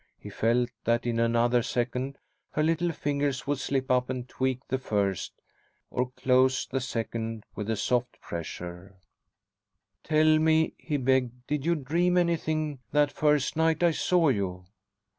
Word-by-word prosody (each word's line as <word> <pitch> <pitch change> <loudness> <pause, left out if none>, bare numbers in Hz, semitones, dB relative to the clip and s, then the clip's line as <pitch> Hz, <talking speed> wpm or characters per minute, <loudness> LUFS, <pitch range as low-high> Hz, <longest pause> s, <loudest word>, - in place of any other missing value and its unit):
He - - -10
felt 120 +2 +1
that 115 +1 +1
in 115 -1 0
another 120 +1 +3
second 125 +4 -2 0.4
her 150 - +1
little 165 +2 +1
fingers 140 -3 -1
would 145 -1 -1
slip 130 -1 -1
up 125 0 +2
and 130 -1 -4
tweak 130 0 -2
the 130 - -1
first, 100 -7 -1 0.6
or 125 0 -1
close 130 0 +2
the 135 0 -3
second 115 -3 -3
with 105 0 -5
a 110 - +1
soft 125 +3 -1
pressure 90 +3 -7 1.1
"Tell 155 0 +4
me," 160 0 +3
he 150 -3 -2
begged: 125 -2 0
"did 150 +2 -2
you 170 - +3
dream 170 +5 +1
anything 155 -4 0
that 145 -1 +3
first 150 -2 +1
night 160 +1 +2
I 170 - +5
saw 170 0 +2
you?" 95 -6 -2
130 Hz, 150 wpm, -28 LUFS, 120-150 Hz, 1.1 s, I